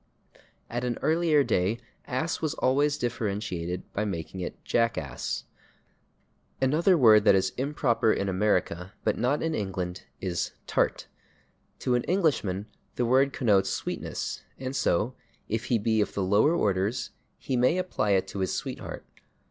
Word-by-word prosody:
At 120 +1 -3
an 120 -2 -1
earlier 160 -2 +3
day 95 -1 +1 0.3
/ass/ 160 +7 -2
was 155 -3 -1
always 145 +3 +2
differentiated 100 -7 -2
by 105 - 0
making 95 -2 -4
it 90 - -5
/jackass/. 100 - -1 1.2
Another 160 +8 +3
word 110 -6 +7
that 100 - +7
is 95 0 +2
improper 130 -4 +1
in 100 - 0
America 95 -1 0
but - - +2
not 130 +5 0
in 160 0 0
England 95 - -3
is 90 -2 -2
/tart/. - - +1 0.8
To 125 - +1
an 120 - +2
Englishman 140 - +1 0.3
the 125 - +1
word 135 +3 +4
connotes 105 -8 +2
sweetness, - - -4 0.2
and 130 +1 -4
so, 125 -1 +1 0.3
if 110 +1 -2
he 120 - +2
be 110 0 +1
of - - -2
the 100 - 0
lower 105 - +4
orders, 100 - 0 0.3
he 130 - -3
may 125 +8 +3
apply 180 - 0
[Pg130] - - +5
it 95 0 -1
to 100 - -5
his 95 - 0
sweetheart. - - -5
110 Hz, 150 wpm, -27 LUFS, 95-135 Hz, 1.2 s, word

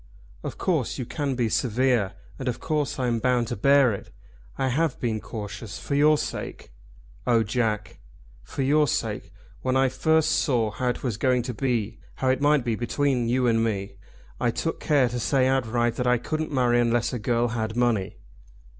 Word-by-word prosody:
"Of - - -6
course - - 0
you 125 - -3
can 140 +1 -2
be 120 -2 +1
severe, 120 -3 +1 0.3
and 130 - -4
of 125 - -1
course 150 -3 -1
I 130 - -1
am 120 -2 +1
bound 125 -1 +1
to - - -2
bear 140 +1 +4
it. 100 - -7 0.5
I 135 - 0
have 150 +3 0
been 115 -3 -1
cautious, 105 -1 -7
for - - -5
your 150 +2 +5
sake!" - - -5 0.6
"Oh, 115 -2 +4
Jack!" 110 -1 -2 0.4
"For 95 - -4
your 150 +2 +3
sake. - - -2 0.3
When 130 0 +1
I 135 0 +3
first 160 +3 +2
saw 120 -8 +1
how 125 +4 -3
it 125 - -3
was 120 -6 -2
going 125 0 +2
to 125 0 -4
be, 115 -3 -1 0.2
how 130 - 0
it 130 +1 +1
might 145 -3 +3
be 115 - +1
between 120 +1 0
you 125 +1 +2
and 115 -1 +3
me, 100 -3 -2 0.5
I - - +2
took - - -2
care 140 -4 +3
to 120 +1 -3
say 130 +2 +2
outright 120 -3 +1
that 125 - 0
I 125 0 +4
couldn't 155 +6 -3
marry 125 -3 +3
unless 120 +1 +1
a 125 - -2
girl 120 +2 +1
had 110 -1 -3
money." 115 -6 +1
125 Hz, 190 wpm, -25 LUFS, 115-135 Hz, 0.6 s, your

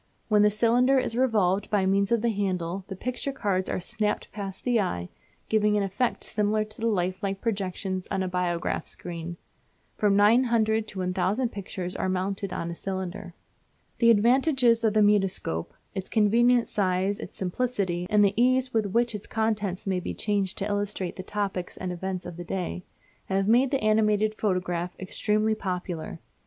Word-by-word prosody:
When 210 -1 +5
the 210 - +6
cylinder 240 +5 +3
is 240 -3 0
revolved 205 -6 +2
by 200 -3 +2
means 195 +2 +2
of 235 -1 +2
the 235 - +2
handle 190 -3 -2
the 195 - -6
picture 250 +7 -3
cards 195 -8 -1
are - - -1
snapped 210 +2 -2
past 195 -2 -6
the 245 -2 +3
eye, 90 - -3 0.4
giving 210 -1 +2
an 205 - +1
effect 200 +6 -1
similar 215 0 0
to 215 +1 -10
the 230 - +1
lifelike 195 -1 -1
projections 190 -3 -3
on 190 - -1
a - - -2
biograph 180 -1 -1
screen. 170 0 -6 0.6
From 205 -2 +3
900 220 0 +3
to 195 - -9
1000 190 +7 0
pictures 185 -2 -5
are 185 - -1
mounted 190 +1 -2
on 170 -1 -3
a - - -4
cylinder. 190 0 -5 0.6
The 235 - +5
advantages 240 +1 +4
of 220 -1 +2
the 215 - +5
mutoscope 195 - +1 0.2
its 190 -2 -5
convenient 235 +3 +4
size, 190 0 0
its - - -8
simplicity, 185 -3 -1
and 210 -1 +5
the 200 - +2
ease 255 +2 +2
with 220 -2 +1
which 235 +4 +1
its 210 -1 -6
contents 215 -3 -1
may 190 -2 0
be - - -5
changed 200 -3 -1
to 195 - +1
illustrate 205 -3 -2
the - - -6
topics 195 -2 -3
and 185 -1 -4
events 185 +1 -4
of 175 -1 -7
the 175 - -5
day 180 0 -4 0.4
have 195 0 0
made 245 +4 +4
the 275 -4 -1
animated 215 0 +3
photograph 180 -4 -1
extremely 215 +3 0
popular. 180 -5 -4
205 Hz, 170 wpm, -27 LUFS, 185-220 Hz, 0.6 s, the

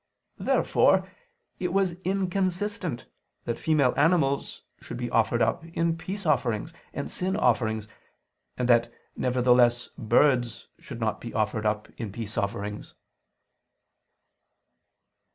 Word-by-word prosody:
Therefore - - +3 0.5
it 180 -1 -1
was 190 -3 +1
inconsistent 185 - -1 0.4
that 120 - -3
female 145 -6 +3
animals 145 -3 +1 0.2
should - - -7
be - - -4
offered - - +3
up - - 0
in 165 0 -1
peace 190 +4 -6
offerings 125 -8 0 0.2
and - - -5
sin 185 +1 -1
offerings, 110 -3 +1 0.7
and 125 - 0
that 120 -1 +4 0.2
nevertheless 125 -1 +3
birds 120 -1 +2
should 125 -4 -9
not 110 -2 -1
be 115 - -7
offered 110 0 0
up 105 0 -1
in 110 -4 -4
peace 110 0 -6
offerings. 105 0 -3
125 Hz, 115 wpm, -27 LUFS, 115-170 Hz, 0.7 s, that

